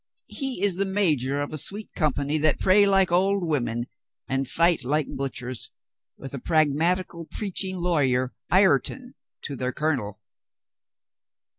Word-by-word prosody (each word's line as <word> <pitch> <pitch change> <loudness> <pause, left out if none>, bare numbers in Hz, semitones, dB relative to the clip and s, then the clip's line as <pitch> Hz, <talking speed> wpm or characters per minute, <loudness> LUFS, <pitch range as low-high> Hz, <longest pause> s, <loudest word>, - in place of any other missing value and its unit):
He 270 -8 -3
is 195 -3 +3
the 195 - +1
major 150 -9 0
of 145 - -7
a 155 - -2
sweet 205 +8 -4
company 150 -1 0
that 155 0 +2
pray 200 +2 +5
like 195 -2 +3
old 190 +2 +2
women 120 -6 -1 0.4
and 135 0 -1
fight 170 -4 +2
like 150 +3 -1
butchers, 130 -2 -3 0.5
with 135 -1 -9
a 140 - -4
pragmatical 165 +4 +1
preaching 190 -2 -3
lawyer 135 -8 +1 0.2
Ireton 195 - +2 0.3
to 140 - -5
their 125 0 -2
colonel. 120 -9 -2
155 Hz, 135 wpm, -25 LUFS, 135-190 Hz, 0.5 s, pray